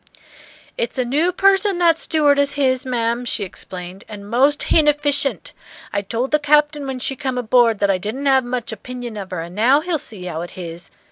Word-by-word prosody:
"It's 480 - -2
a 255 - +1
new 300 +8 +1
person 390 +1 +3
that 340 -2 +4
stewardess 285 -2 +2
h'is, 260 -2 +1
ma'am," 235 -1 -1
she 230 -3 0
explained, 185 0 -8
"and 205 -2 -9
most 270 +6 +2
h'inefficient! 290 -2 +2 0.4
I 200 - 0
told 230 +6 -3
the 300 - +3
Captain 295 -1 +2
when 265 -1 -3
she 270 +2 -3
come 260 -1 -3
aboard 240 -1 +3
that 200 0 +2
I 185 - 0
didn't 220 +9 -4
'ave 265 -2 +3
much 245 -2 -3
opinion 245 +1 -7
of 195 -2 -6
her, 180 -3 -4
and 170 +1 -8
now 250 +9 +3
he'll 335 -1 -1
see 205 -8 -9
how 165 -2 -4
it 175 - -7
h'is. 170 -1 -7
255 Hz, 195 wpm, -20 LUFS, 210-290 Hz, 0.4 s, that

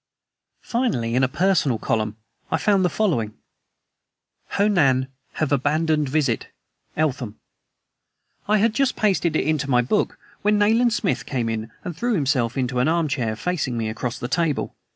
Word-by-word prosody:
Finally, 225 - -1
in 130 +2 +2
a - - +4
Personal 160 -5 +2
Column, 110 -1 -1 0.3
I - - +1
found 200 -3 +2
the 180 - +3
following: 145 - 0 1.2
"HO 200 +1 +4
NAN. 135 -10 +3 0.2
Have 155 -2 -1
abandoned 150 +2 +1
visit. 135 -5 0 0.5
ELTHAM." 125 -8 -1 1.1
I 215 +1 +4
had 215 +2 +2
just 275 +1 +1
pasted 185 -6 +1
it - - +1
into 150 -2 0
my 125 -2 +4
book 210 - 0 0.2
when 210 +1 +3
Nayland 225 +3 +3
Smith 205 -5 -1
came 125 -4 -1
in 110 0 -3
and 175 -3 -5
threw 235 +6 0
himself 135 - 0
into 125 -1 0
an 125 - +2
arm 165 -1 +1
chair, 120 -6 -1
facing 135 -3 -2
me 110 -1 -1
across 120 +2 -4
the 120 - -4
table. 165 0 -1
150 Hz, 160 wpm, -23 LUFS, 125-190 Hz, 1.2 s, a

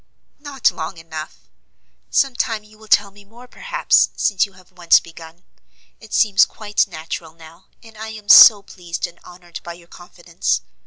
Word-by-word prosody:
"Not 285 -3 -1
long 160 +1 -7
enough: 160 -1 -10 0.6
some 270 -2 +1
time 225 -4 -2
you 215 0 -21
will 220 - -16
tell 205 -1 +2
me 205 +1 -18
more 235 +5 -17
perhaps, - - +1
since 205 0 0
you 195 - -23
have 185 0 -21
once 175 -2 +3
begun. 165 +1 -15 0.6
It 220 - -17
seems 205 -3 +3
quite 210 -1 -2
natural 160 -1 -8
now, 165 0 -17 0.2
and 225 -1 -17
I 220 +1 -8
am 215 -2 -11
so 210 -1 +9
pleased 175 -3 -7
and 175 - -13
honored 175 -1 -12
by 170 - -8
your 170 0 -18
confidence. 170 - -4
190 Hz, 170 wpm, -19 LUFS, 170-215 Hz, 0.6 s, so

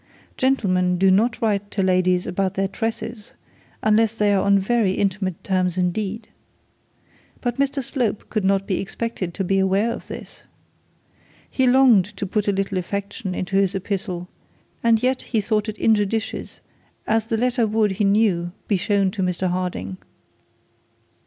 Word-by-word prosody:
Gentlemen 185 -9 +1
do 190 +1 +4
not 220 +5 +2
write 205 -2 0
to 195 - -1
ladies 185 -1 +2
about 190 +1 -1
their 195 0 +1
tresses, 225 +1 -5 0.5
unless 220 +1 +3
they 210 -2 +2
are 195 - +2
on 200 0 +4
very 195 0 +1
intimate 190 -2 -1
terms 185 -2 0
indeed. 200 +4 -2 1.1
But 245 +1 -3
Mr 275 0 0
Slope 240 -5 -2
could 215 -3 0
not 195 0 +2
be 190 - -1
expected 195 -2 -4
to 195 - -1
be 195 +1 +1
aware 195 +4 +2
of - - -9
this. - - -9 1.1
He 260 -1 +1
longed 250 -7 +6
to - - -2
put 210 +2 -1
a - - +4
little 195 -1 -1
affection 195 0 -4
into 195 +1 -1
his 195 -1 +2
epistle, 185 -2 -3 0.6
and 230 0 +3
yet 255 0 +1
he 225 - -1
thought 210 +1 0
it 215 - -6
injudicious, 220 0 0 0.4
as 220 0 +1
the 225 - 0
letter 245 0 +1
would 215 -1 +2
he 200 +2 -1
knew 195 -4 +2
be 200 - +2
shown 195 0 +1
to 190 - -4
Mr 180 0 0
Harding. 175 - -3
200 Hz, 160 wpm, -22 LUFS, 185-225 Hz, 1.1 s, longed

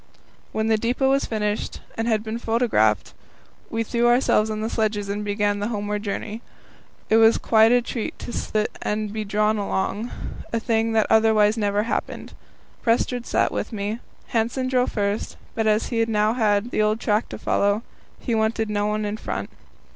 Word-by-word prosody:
When 220 - -1
the 220 -1 +3
depot 250 +4 +1
was 275 0 +2
finished 210 -1 -2 0.2
and 225 +1 -2
had 220 -2 +1
been 220 +1 -4
photographed, 225 - +1 0.6
we 225 0 -1
threw 235 +1 +1
ourselves 240 -3 +3
on 215 0 -3
the 220 - -1
sledges 210 -2 -1
and 205 +1 -2
began 205 0 0
the 205 - -1
homeward 210 -2 -2
journey. 210 +2 -4 0.7
It 220 - +6
was 225 0 +6
quite 220 0 +4
a 245 0 +4
treat 235 -1 -4
to 240 - -7
sit 215 -1 -1
and 210 0 -2
be 215 0 -2
drawn 210 +1 +1
along, 205 +3 -2 0.4
a 230 - 0
thing 225 0 0
that 220 -1 +3
otherwise 220 -1 +4
never 205 -2 +1
happened. 230 - -4 0.5
Prestrud 240 +1 0
sat - - +2
with - - -3
me. 210 +1 -3 0.3
Hanssen 240 +3 0
drove 255 -1 +1
first, 205 0 -2 0.2
but 220 -1 0
as 215 +1 +2
he 230 -2 +1
now 215 0 +2
had 220 -1 +1
the - - +1
old 215 +1 +2
track 215 0 0
to - - -6
follow, 205 +3 +1 0.4
he 240 - -2
wanted 220 0 0
no 205 0 0
one 210 0 -1
in 210 +1 -3
front. - - -4
220 Hz, 180 wpm, -23 LUFS, 210-230 Hz, 0.7 s, It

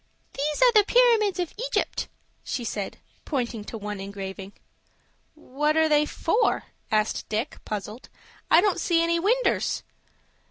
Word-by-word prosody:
"There 275 - -3 0.2
are - - +6
the 425 -3 +6
Pyramids 450 -4 +4
of 350 -2 -2
Egypt," - - -1 0.4
she 245 - -3
said, 205 -3 -4 0.3
pointing 240 -6 -3
to 225 - -6
one 210 -1 -5
engraving. 195 0 -7 0.8
"What 300 +1 -1
are 320 0 +4
they 300 -1 +3
for?" 450 +8 +1 0.3
asked 215 0 0
Dick, 220 +7 -3
puzzled. 210 +3 -6 0.4
"I 330 - +7
don't 400 -1 +1
see 335 -2 +2
any 335 0 +1
winders." 475 +8 +1
295 Hz, 135 wpm, -25 LUFS, -, 0.8 s, I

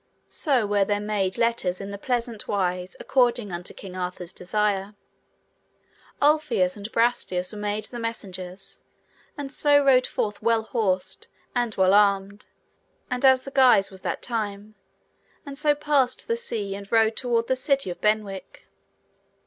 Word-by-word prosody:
So 265 -8 +1
were 205 -1 +2
there 205 +1 0
made 205 -2 -1
letters 230 -6 0
in 195 0 -6
the 200 - -5
pleasant 235 -2 -2
wise 180 -2 -1
according 240 -5 +1
unto 175 +1 -5
King 185 -2 -10
Arthur's 180 -1 -5
desire. 205 +1 -1 1.2
Ulfius 290 -12 +2
and 205 +2 -8
Brastias 210 -6 +1
were 210 - -7
made 210 +1 -2
the 240 +2 -6
messengers, 190 -5 -6 0.6
and 280 -2 -5
so 290 0 +3
rode 255 -2 +5
forth 210 -1 -3
well 225 0 +2
horsed 190 -5 -2 0.3
and 240 -3 -1
well 190 0 +4
armed 200 0 +2 0.6
and 250 +1 -2
as 260 -1 +6
the 275 - -8
guise 255 -8 +5
was 190 -1 -12
that - - -3
time, 215 -3 -4 0.7
and 280 -1 -7
so 295 0 +2
passed 285 -4 +1
the 465 - +1
sea 220 - -3
and 200 0 -9
rode 225 -1 +4
toward 235 -2 0
the 260 - +1
city 270 - +1
of 175 - -9
Benwick. 210 -3 -2
215 Hz, 150 wpm, -25 LUFS, 195-250 Hz, 1.2 s, as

